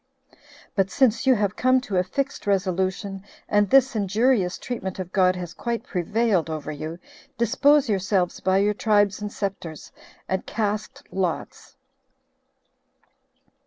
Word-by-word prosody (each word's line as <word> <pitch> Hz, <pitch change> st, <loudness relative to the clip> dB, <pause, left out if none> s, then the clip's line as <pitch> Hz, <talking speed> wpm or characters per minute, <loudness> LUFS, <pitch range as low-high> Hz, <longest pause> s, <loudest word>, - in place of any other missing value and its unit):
"But 195 Hz, -1 st, +1 dB
since 260 Hz, 0 st, +2 dB
you 260 Hz, -, +6 dB
have 205 Hz, -2 st, 0 dB
come 255 Hz, 0 st, +3 dB
to 200 Hz, -6 st, -3 dB
a 180 Hz, -, +3 dB
fixed 275 Hz, +6 st, -3 dB
resolution, 190 Hz, 0 st, -1 dB, 0.3 s
and 205 Hz, -1 st, +2 dB
this 270 Hz, -2 st, +5 dB
injurious 205 Hz, -1 st, +1 dB
treatment 195 Hz, -7 st, -5 dB
of 185 Hz, -2 st, -6 dB
God 185 Hz, -1 st, +3 dB
has 175 Hz, -2 st, -6 dB
quite 235 Hz, -2 st, -3 dB
prevailed 195 Hz, -1 st, 0 dB
over 155 Hz, -1 st, -4 dB
you, 155 Hz, +3 st, -6 dB, 0.4 s
dispose 275 Hz, +5 st, +3 dB
yourselves 190 Hz, -3 st, 0 dB
by 190 Hz, 0 st, +2 dB
your 205 Hz, +1 st, +2 dB
tribes 205 Hz, -1 st, +2 dB
and 210 Hz, 0 st, -4 dB
scepters, 190 Hz, -7 st, -5 dB, 0.4 s
and 190 Hz, 0 st, -1 dB
cast 215 Hz, -1 st, -3 dB
lots." 185 Hz, -3 st, -4 dB
200 Hz, 130 wpm, -24 LUFS, 185-230 Hz, 0.4 s, you